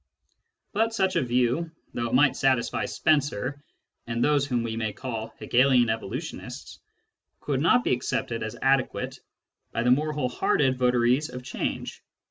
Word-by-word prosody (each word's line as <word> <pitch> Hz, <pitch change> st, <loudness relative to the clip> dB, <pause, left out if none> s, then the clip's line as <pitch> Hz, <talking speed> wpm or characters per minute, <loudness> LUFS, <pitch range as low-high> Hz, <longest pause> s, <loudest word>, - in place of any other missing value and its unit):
But 225 Hz, +1 st, +1 dB
such 190 Hz, -3 st, +1 dB
a -, -, +3 dB
view, 125 Hz, +6 st, +1 dB, 0.2 s
though 120 Hz, 0 st, -2 dB
it 115 Hz, -, 0 dB
might 140 Hz, +1 st, +5 dB
satisfy 130 Hz, -1 st, +1 dB
Spencer 145 Hz, -1 st, 0 dB, 0.4 s
and 115 Hz, 0 st, -1 dB
those 145 Hz, -1 st, +2 dB
whom 120 Hz, -4 st, 0 dB
we 115 Hz, -1 st, -3 dB
may 110 Hz, -2 st, -2 dB
call 115 Hz, -1 st, -5 dB
Hegelian 125 Hz, -2 st, +3 dB
evolutionists, 110 Hz, -3 st, -6 dB, 0.6 s
could 140 Hz, -2 st, -1 dB
not 245 Hz, +10 st, +4 dB
be -, -, +2 dB
accepted 120 Hz, -1 st, -2 dB
as 110 Hz, 0 st, -5 dB
adequate 135 Hz, -1 st, +1 dB, 0.5 s
by 115 Hz, -, -1 dB
the 125 Hz, -, +3 dB
more 150 Hz, +4 st, +2 dB
whole 145 Hz, -4 st, -1 dB
hearted 130 Hz, +1 st, +1 dB
votaries 125 Hz, +3 st, +2 dB
of 125 Hz, 0 st, -8 dB
change. 130 Hz, -, -4 dB
125 Hz, 150 wpm, -26 LUFS, 120-145 Hz, 0.6 s, might